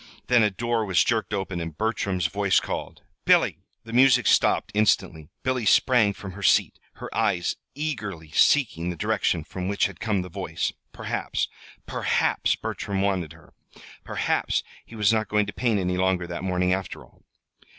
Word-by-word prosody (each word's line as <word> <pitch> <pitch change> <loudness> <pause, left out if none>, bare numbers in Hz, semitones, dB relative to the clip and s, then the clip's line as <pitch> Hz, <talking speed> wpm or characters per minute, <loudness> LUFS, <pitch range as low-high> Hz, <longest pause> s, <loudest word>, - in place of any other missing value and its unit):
Then 125 -2 +4
a 105 - +4
door 115 +3 -1
was 95 -4 +3
jerked 110 -3 -1
open, 95 -3 -3
and 85 -2 -6
Bertram's 100 -5 -1
voice 100 +2 +2
called: - - -6 0.2
"Billy!" - - +3 0.2
The 115 - -10
music 125 0 +5
stopped - - +3
instantly. 95 -7 +1
Billy 130 -2 0
sprang 110 -1 +4
from 95 -1 -8
her 100 +2 -10
seat, - - +3
her - - -9
eyes 85 -1 +1 0.2
eagerly 105 - -4
seeking 90 - +3
the 90 - -3
direction 80 0 0
from 90 +3 -6
which 100 +1 +1
had - - -5
come 105 -5 0
the - - -8
voice. 85 - -3 0.2
Perhaps - - -3 0.4
perhaps - - 0
Bertram 95 -1 -3
wanted 90 -6 -1
her. 80 -1 -19 0.5
Perhaps - - -1 0.2
he 115 - -12
was 105 0 +3
not 110 -1 0
going 105 0 +2
to 100 - -7
paint 115 -5 +1
any 90 -1 -1
longer 95 -1 +1
that 85 0 -6
morning, 90 -1 +1
after 95 -1 -4
all. - - -24
100 Hz, 170 wpm, -25 LUFS, 90-110 Hz, 0.5 s, music